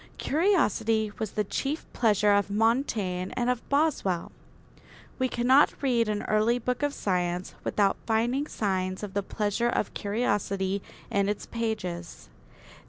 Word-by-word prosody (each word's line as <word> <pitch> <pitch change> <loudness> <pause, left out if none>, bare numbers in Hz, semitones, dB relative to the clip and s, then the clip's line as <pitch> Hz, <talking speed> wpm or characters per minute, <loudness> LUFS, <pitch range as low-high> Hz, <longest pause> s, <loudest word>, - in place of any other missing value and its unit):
Curiosity 225 - +2
was 220 -3 -3
the 210 - +1
chief 275 - -3
pleasure 210 -3 +3
of 200 0 +2
Montaigne 210 -4 0
and 245 0 +2
of 250 -1 -2
Boswell. 280 - +1 0.9
We 255 0 +1
cannot 260 +5 +4
read 235 -4 +2
an 210 -1 -1
early 215 +3 +2
book 250 +2 -2
of 290 0 +1
science 180 -6 -1
without 200 -2 +2
finding 240 +6 +1
signs 185 -4 -2
of 200 -2 -5
the 200 - 0
pleasure 210 +3 -1
of 225 - -1
curiosity 200 -2 -1 0.3
in 200 0 +2
its 210 - -3
pages. 180 - -4
215 Hz, 135 wpm, -27 LUFS, 195-245 Hz, 0.9 s, cannot